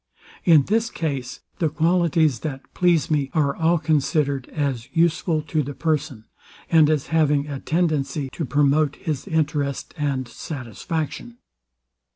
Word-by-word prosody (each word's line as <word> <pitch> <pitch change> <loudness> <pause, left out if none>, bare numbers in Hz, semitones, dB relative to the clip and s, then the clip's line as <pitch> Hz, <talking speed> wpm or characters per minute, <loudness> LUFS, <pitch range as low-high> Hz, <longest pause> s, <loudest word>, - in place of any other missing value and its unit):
In 160 -5 +6
this 225 - 0
case, 135 -6 -4 0.2
the 160 - +2
qualities 165 -4 +2
that 135 -2 -5
please 175 -4 +2
me 145 -3 +1
are 145 -3 +2
all 165 +1 +2
considered 145 -3 0
as 135 -6 -2
useful 165 -1 +1
to 155 0 -1
the 145 0 -5
person, 150 -8 -2 0.5
and 160 -3 +6
as 150 -3 +1
having 150 -2 +2
a 140 -2 -5
tendency 155 -4 0
to 165 - -4
promote 145 +1 +2
his 155 +2 -4
interest 150 -5 -1
and 135 -3 -1
satisfaction. 120 - -5
150 Hz, 135 wpm, -23 LUFS, 140-160 Hz, 0.5 s, In